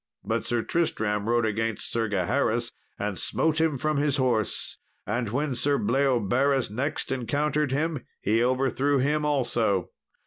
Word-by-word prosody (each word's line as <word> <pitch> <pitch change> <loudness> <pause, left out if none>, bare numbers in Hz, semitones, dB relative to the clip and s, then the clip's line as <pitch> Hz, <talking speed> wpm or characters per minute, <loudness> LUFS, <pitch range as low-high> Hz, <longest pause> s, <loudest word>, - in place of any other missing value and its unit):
But - - -2
Sir 120 -1 0
Tristram 110 -10 -1
rode 120 -1 +2
against 110 +1 -1
Sir 115 -1 0
Gaheris 115 +4 0 0.3
and - - -3
smote 160 0 +1
him 160 -3 +1
from 155 +3 0
his 145 0 +1
horse, 120 -5 0 0.3
and 115 +2 -1
when 140 +5 -1
Sir 140 +3 +1
Bleoberis 130 +1 +1
next 130 +7 -2
encountered 145 +3 0
him, 150 0 -1 0.2
he 115 +3 +2
overthrew 135 +2 +1
him 150 +3 +1
also. 120 - +1
130 Hz, 140 wpm, -26 LUFS, 115-145 Hz, 0.3 s, rode